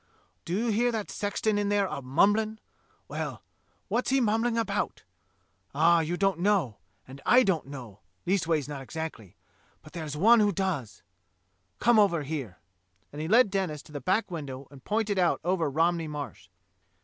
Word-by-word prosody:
Do 175 - -2
you 230 +1 0
hear 240 +3 +2
that 220 -3 -4
sexton 205 +1 -1
in 205 -1 0
there 205 -1 +2
a 160 - -4
mumbling? 205 +11 +2 0.5
Well, - - -5 0.4
what's 230 +5 0
he 270 +1 +3
mumbling 230 0 +1
about? 205 -3 -2 0.7
Ah, 165 +3 +5
you 165 +2 -1
don't 195 -3 +1
know, 180 - +1 0.3
and 135 +2 -11
I 255 +1 +6
don't 180 - 0
know 120 -8 -9 0.3
(leastways 165 -6 +1
not 145 -2 -6
exactly), 135 - -7 0.5
but 155 - -15
there's 155 -3 -5
one 225 +8 +6
who 205 -1 +3
does. 170 - -3 0.7
Come 235 -2 +4
over 175 -7 +3
here," 135 - -5 0.6
and 150 - -5
he 160 - -3
led 225 +2 +5
Denis 185 -7 -2
to - - -17
the 145 -1 -6
back 190 +2 0
window 140 -5 -6
and 135 -2 -14
pointed 210 -2 0
out 175 -2 +2
over 175 -3 +1
Romney 165 +3 +1
Marsh. 150 -2 -7
175 Hz, 165 wpm, -28 LUFS, 150-210 Hz, 0.7 s, I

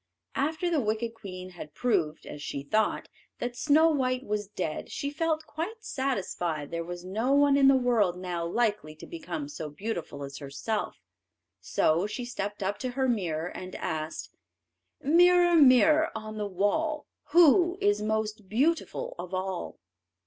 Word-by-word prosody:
After 315 +5 -1
the 310 -4 +2
wicked 225 +1 -1
queen 185 -4 -8
had 160 -4 -10
proved, 160 -11 0
as 145 - -8
she 140 -1 -4
thought, 215 +9 0 0.3
that 245 0 -4
Snow 315 +5 +4
white 255 -3 0
was 205 -1 -2
dead, 180 -6 -4
she 280 - -3
felt 315 +1 -1
quite 350 +10 -6
satisfied 180 - -2
there 170 0 -2
was 175 +1 -7
no 220 +8 0
one 285 0 +5
in 275 -1 +5
the 270 - +7
world 225 -8 +2
now 180 -2 -3
likely 205 -4 -1
to 155 - -11
become 310 -3 -5
so 160 - -6
beautiful 155 -3 -5
as 140 0 -7
herself, 140 +10 -3 0.6
so 170 +6 +1
she 240 +3 -5
stepped 205 -4 -4
up 200 +2 -2
to 255 - -2
her 260 +1 0
mirror 175 -9 -1
and 185 0 -8
asked: 155 0 -4 0.7
"Mirror, 350 +3 +5
mirror 300 +3 +6
on 215 0 -6
the 210 - -1
wall, 295 - 0 0.2
Who 350 +3 +5
is 410 0 +2
most 215 -2 -2
beautiful 330 - 0
of 180 +1 -5
all?" 185 -1 -4
220 Hz, 155 wpm, -28 LUFS, 180-290 Hz, 0.7 s, the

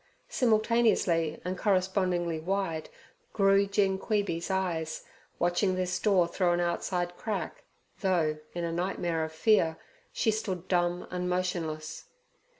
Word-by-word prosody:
Simultaneously 220 - +2
and 180 +1 -2
correspondingly 185 -4 +1
wide 175 -2 -2 0.4
grew 195 -1 +4
Gin 195 -1 +1
Queeby's 200 -6 -1
eyes 175 -4 -1 0.3
watching 175 +2 +1
this 185 0 -1
door 190 -5 +3
through 175 0 +1
an 175 - +1
outside 175 0 -1
crack, 200 -7 -4 0.4
though, 165 -6 +1 0.2
in 175 - -2
a 170 - -1
nightmare 170 -2 -1
of 160 - -4
fear, 160 -1 +3 0.3
she 220 - +1
stood 190 -5 -3
dumb 175 -1 +1
and 180 0 -2
motionless. 165 -4 -2
180 Hz, 125 wpm, -29 LUFS, 170-195 Hz, 0.4 s, grew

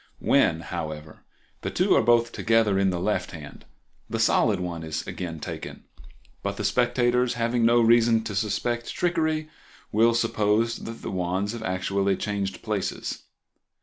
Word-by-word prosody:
When, 80 - +2
however, 80 -2 -7 0.4
the - - -3
two - - +2
are - - +5
both 120 +1 +3
together 115 -4 +2
in 95 -1 +3
the 90 -2 -2
left 90 0 -1
hand 75 -3 -10 0.4
the 115 - -2
solid 110 -2 +3
one 85 -2 -4
is 80 -1 -4
again 85 -3 -5
taken, - - -7 0.6
but 100 0 -3
the - - -3
spectators, 120 +3 +2
having 115 0 +1
no 120 0 +5
reason 115 -1 +4
to 110 - -5
suspect 110 +4 -1
trickery, 155 -3 0 0.4
will 115 +2 +4
suppose 115 0 +1
that 115 0 -8
the - - -4
wands 95 +2 -1
have 115 -1 -6
actually 95 0 0
changed 100 -2 -3
places. 105 -4 -3
105 Hz, 150 wpm, -25 LUFS, 95-115 Hz, 0.6 s, are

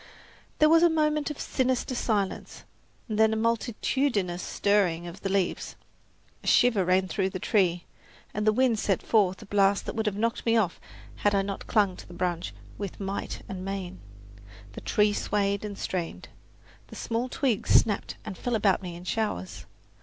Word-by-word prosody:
There 305 - +6
was 330 +1 +6
a 345 - +6
moment 305 -2 +1
of 300 - -6
sinister 260 -1 0
silence, 210 -5 -2 0.4
then 220 0 +3
a - - 0
multitudinous 225 -3 0
stirring 190 -5 +1
of 175 +1 -9
the 195 - -2
leaves. 190 -2 -1 0.7
A - - -8
shiver 235 -6 +4
ran 185 +1 +2
through 190 0 0
the 185 - -5
tree, 180 -3 +1 0.5
and 210 +1 -2
the - - +7
wind 240 -1 +2
sent 195 -3 0
forth 200 -2 +2
a - - -12
blast 200 0 +2
that - - -4
would 220 -1 -1
have 200 -1 -1
knocked 230 +2 -1
me 230 0 +3
off 195 -6 0 0.4
had 205 -1 +2
I 195 - +2
not 195 0 -5
clung 205 -5 +2
to - - -11
the 175 - -11
branch 175 -1 -2 0.3
with 200 -3 -5
might 195 0 -4
and 190 -1 -6
main. 190 -1 -5 0.7
The - - -8
tree 210 0 +2
swayed 200 -1 0
and 205 -2 -5
strained. 165 - -4 0.6
The - - -11
small 235 +2 -2
twigs 250 -5 -1
snapped 205 -3 +3
and 210 -3 -5
fell 245 +5 -2
about 200 -3 +2
me 175 -2 -6
in 175 - -10
showers. 185 - -3
205 Hz, 175 wpm, -27 LUFS, 185-225 Hz, 0.7 s, the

